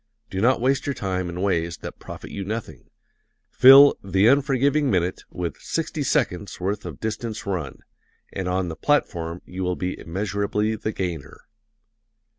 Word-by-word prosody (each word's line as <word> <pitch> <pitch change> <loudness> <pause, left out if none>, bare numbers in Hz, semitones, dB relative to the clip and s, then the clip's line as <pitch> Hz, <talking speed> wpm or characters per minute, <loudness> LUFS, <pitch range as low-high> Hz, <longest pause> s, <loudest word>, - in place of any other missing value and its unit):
Do 95 - -2
not 125 +4 +3
waste 130 +4 +1
your 140 - -1
time 95 -2 -2
in 90 +2 -4
ways 85 -4 0
that - - -9
profit - - -9
you 100 - -4
nothing. 110 +3 -6 0.6
Fill 135 +2 +9
"the 95 +1 +2
unforgiving 140 +1 +2
minute" 90 -3 -1
with 90 -2 -4
"sixty 165 -1 -3
seconds' 100 -7 -1
worth 100 +2 -2
of 80 -5 -8
distance 110 0 -4
run" 90 -8 -4 0.5
and 95 - -3
on 90 0 0
the 80 - -5
platform 85 - -1
you 95 +1 -7
will 90 0 0
be 90 +1 -4
immeasurably 100 +4 -1
the 110 0 -3
gainer. 90 -8 -5
100 Hz, 155 wpm, -23 LUFS, 90-120 Hz, 0.6 s, Fill